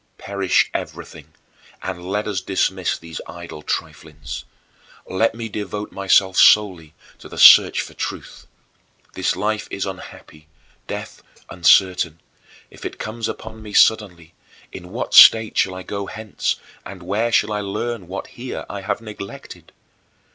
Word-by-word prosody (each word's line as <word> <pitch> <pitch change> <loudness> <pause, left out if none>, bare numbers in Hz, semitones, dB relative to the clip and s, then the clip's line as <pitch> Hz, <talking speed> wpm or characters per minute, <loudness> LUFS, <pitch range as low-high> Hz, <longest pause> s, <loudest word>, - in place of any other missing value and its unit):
19. - - -15
"Perish 100 -2 +1
everything - - -7 0.5
and 90 -2 -5
let 100 +4 -3
us 100 -3 -2
dismiss 95 -1 -1
these 85 -1 -9
idle 85 -2 -9
triflings. 75 -1 -6 0.6
Let 110 +4 0
me 115 -1 -5
devote 105 0 -5
myself 95 -1 +2
solely 90 -7 +4 0.2
to - - -13
the - - -10
search - - +8
for - - -9
truth. - - -7 0.7
This - - -1
life 105 +3 -2
is 100 - -3
unhappy, 80 -5 -10 0.4
death - - -7 0.3
uncertain. 90 -2 +3 0.5
If - - -14
it - - -6
comes 110 +1 -4
upon 110 0 -8
me 105 -1 -10
suddenly, 90 -8 +2 0.4
in 90 -1 -10
what 115 +6 -5
state 110 -1 +8
shall 95 - +1
I 95 - -7
go 100 0 -5
hence 110 -1 -3 0.3
and 95 -2 -10
where 105 +6 -1
shall 110 - +2
I 105 - -2
learn 100 0 -4
what 95 +2 -6
here 125 +1 -7
I 100 - -6
have 95 - -3
neglected? 105 -3 -10
100 Hz, 145 wpm, -21 LUFS, 90-105 Hz, 0.7 s, search